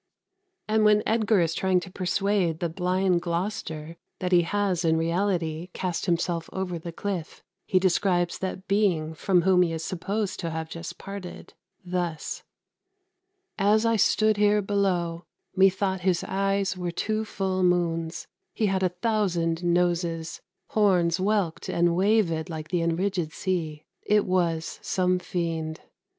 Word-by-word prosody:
" 380 -1 -52
And 215 0 +2
when 210 0 +5
Edgar 220 -3 +2
is 165 -1 +1
trying 185 +1 +2
to 185 - -9
persuade 185 -2 0
the 170 - -1
blind 180 +1 +1
Gloucester 170 -3 -4 0.2
that 180 0 -3
he 175 -1 +6
has 190 0 0
in 160 -1 +3
reality 165 -1 -1
cast 180 -3 -3
himself 170 -1 0
over 180 -3 -3
the 170 +1 -7
cliff, 180 -2 -5 0.2
he 185 - +2
describes 180 -1 +1
the 185 0 -4
being 180 -6 +1
from 180 +2 +2
whom 185 0 +4
he 175 -2 +2
is 160 0 -4
supposed 195 +4 -3
to 170 - -2
have 160 0 -5
just 165 0 -7
parted, 195 -2 -8 0.3
thus: 175 -3 -3 1.2
"As 210 +3 +3
I 230 0 +3
stood 215 0 +3
here 210 0 +4
below, 180 -4 0 0.3
methought 190 0 +3
his 180 -1 +1
eyes 195 0 0
Were 180 -1 -3
two 215 +5 -1
full 190 -3 -2
moons: 170 -2 0 0.3
he 220 - +1
had 190 -2 +1
a 185 - +3
thousand 180 -4 0
noses; 170 -2 0 0.3
Horns 180 -5 +3
whelked 195 -4 0
and 175 0 +2
wavèd 180 -3 +2
like 155 -1 -6
the 180 - 0
enridgèd 170 -1 -1
sea: 160 -5 -3 0.2
It 210 0 +2
was 170 -3 0
some 185 -1 +1
fiend." 165 -4 -3
180 Hz, 145 wpm, -26 LUFS, 170-195 Hz, 1.2 s, he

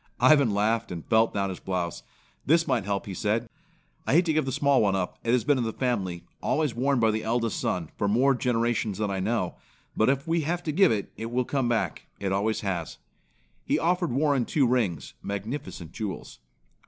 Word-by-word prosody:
Ivan 135 0 +6
laughed, 110 +3 0
and 85 -3 -6
felt 110 0 +3
down 100 -1 -1
his 95 - -6
blouse. 90 -3 -3 0.4
"This 165 +3 +3
might 125 -7 +1
help," 100 -1 -2
he 100 - -6
said. 110 +4 -1 0.6
"I - - +2
hate 170 +4 +5
to 160 - +1
give 155 -2 +1
the 135 - -2
small 140 +1 +3
one 100 -2 +2
up. 90 -2 -3
It 115 - +1
has 125 -1 +3
been 145 -3 +2
in - - 0
the 110 - -1
family, 95 -9 -2 0.2
always 150 -5 0
worn 135 +2 +1
by 110 -1 +4
the 110 0 -2
eldest 115 -1 0
son, 85 -4 -2
for 105 - +1
more 125 +7 +4
generations 120 -4 0
than 105 -2 -1
I 95 - -2
know; 95 -2 -1 0.4
but 110 - +3
if 140 +2 0
we 165 0 +1
have 170 +3 -2
to 155 - -1
give 190 +4 +5
it, 105 -3 -2
it 115 +1 -4
will 125 +1 0
come 135 -3 0
back. 115 -2 -1
It 100 -1 -2
always 105 +3 0
has." 90 -6 -3 0.7
He - - +1
offered 175 -1 +1
Warren 140 -1 +2
two 145 -4 +2
rings, 110 - 0
magnificent 100 - -5
jewels. 105 -4 -6
115 Hz, 210 wpm, -27 LUFS, 100-135 Hz, 0.7 s, Ivan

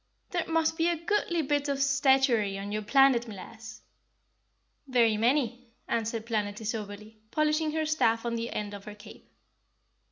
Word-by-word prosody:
"There 350 -2 -1
must 325 0 +1
be 330 - +3
a 345 - +1
goodly 345 -1 0
bit 290 0 0
of 280 -1 -1
statuary 265 -7 +3
on 200 +1 -6
your 215 +1 -2
planet, 250 +1 +4
m'lass?" 220 +2 -10 1.0
"Very 235 -4 +3
many," 245 +1 0 0.2
answered 225 0 -2
Planetty 210 -2 -2
soberly, 215 0 -6
polishing 305 +2 +1
her 315 0 0
staff 230 -7 +1
on 235 - -1
the 230 0 -3
end 205 -1 -4
of 200 -1 -9
her 210 - -8
cape. 210 +1 -14
235 Hz, 155 wpm, -28 LUFS, 215-290 Hz, 1.0 s, planet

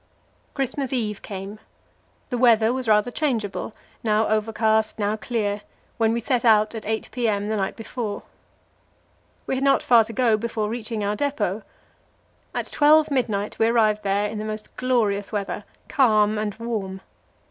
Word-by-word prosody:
Christmas 270 -1 -2
Eve 215 -6 -2
came; 195 +1 -7 0.7
the 245 - 0
weather 230 -2 +5
was 255 -2 -3
rather 215 +2 +3
changeable 230 -9 -2 0.3
now 215 0 +2
overcast, 220 0 +1
now 210 0 0
clear 215 -2 -2 0.4
when 225 -1 +2
we 235 - 0
set 245 +1 0
out 215 -2 +4
at 220 -2 -7
8 220 0 -2
p.m. 215 -4 -1
the 220 - 0
night 195 -2 -2
before. 225 -2 -5 1.2
We - - -2
had 265 +1 -1
not 275 0 +3
far 235 -2 +6
to 230 - -7
go 230 -3 +2
before 215 -1 -2
reaching 225 -2 -3
our 205 +1 0
depot. 230 -6 -1 0.9
At - - -3
12 305 +1 +5
midnight 215 -6 -1
we 225 - +4
arrived 215 -2 +3
there 200 +1 +1
in 210 - -5
the - - -3
most 215 0 -6
glorious 215 -6 0
weather, 205 -1 -3 0.2
calm 215 -5 +3
and 210 -1 -2
warm. 215 -5 -4
220 Hz, 160 wpm, -23 LUFS, 210-240 Hz, 1.2 s, far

